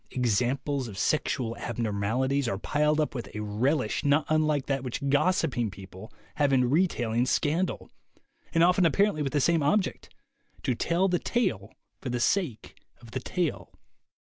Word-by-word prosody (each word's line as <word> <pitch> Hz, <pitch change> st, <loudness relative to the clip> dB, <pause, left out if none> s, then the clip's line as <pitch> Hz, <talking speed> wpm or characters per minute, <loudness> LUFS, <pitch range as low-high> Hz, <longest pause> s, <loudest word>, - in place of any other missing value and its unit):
Examples 125 Hz, +3 st, 0 dB
of 100 Hz, -4 st, -9 dB
sexual 120 Hz, 0 st, 0 dB
abnormalities 120 Hz, +5 st, -1 dB
are 95 Hz, -, -1 dB
piled 150 Hz, +7 st, +1 dB
up 155 Hz, -, 0 dB
with 120 Hz, -3 st, -5 dB
a 105 Hz, -, -3 dB
relish 120 Hz, +5 st, 0 dB
not 145 Hz, +2 st, +3 dB
unlike 155 Hz, -3 st, +2 dB
that 135 Hz, -2 st, -1 dB
which 130 Hz, +2 st, -4 dB
gossiping 145 Hz, -, +1 dB
people 95 Hz, +1 st, -11 dB, 0.3 s
have 145 Hz, -1 st, +2 dB
in 125 Hz, -2 st, +3 dB
re 180 Hz, +6 st, +4 dB
tailing 120 Hz, -4 st, -1 dB
scandal, 165 Hz, +8 st, 0 dB, 0.6 s
and 165 Hz, -1 st, +3 dB
often 180 Hz, +1 st, +4 dB
apparently 195 Hz, -1 st, +2 dB
with 135 Hz, -2 st, -1 dB
the 145 Hz, -, +2 dB
same 165 Hz, +3 st, +2 dB
object 185 Hz, +8 st, 0 dB, 0.3 s
— 280 Hz, -, -32 dB
to 130 Hz, -, +1 dB
tell 170 Hz, +9 st, +1 dB
the 175 Hz, -2 st, +1 dB
tale 115 Hz, -, -1 dB, 0.3 s
for 130 Hz, -, -5 dB
the 120 Hz, 0 st, -1 dB
sake 145 Hz, -, -1 dB, 0.2 s
of 120 Hz, -2 st, -14 dB
the 130 Hz, -, -3 dB
tale. 170 Hz, +5 st, -3 dB
135 Hz, 165 wpm, -27 LUFS, 120-155 Hz, 0.6 s, re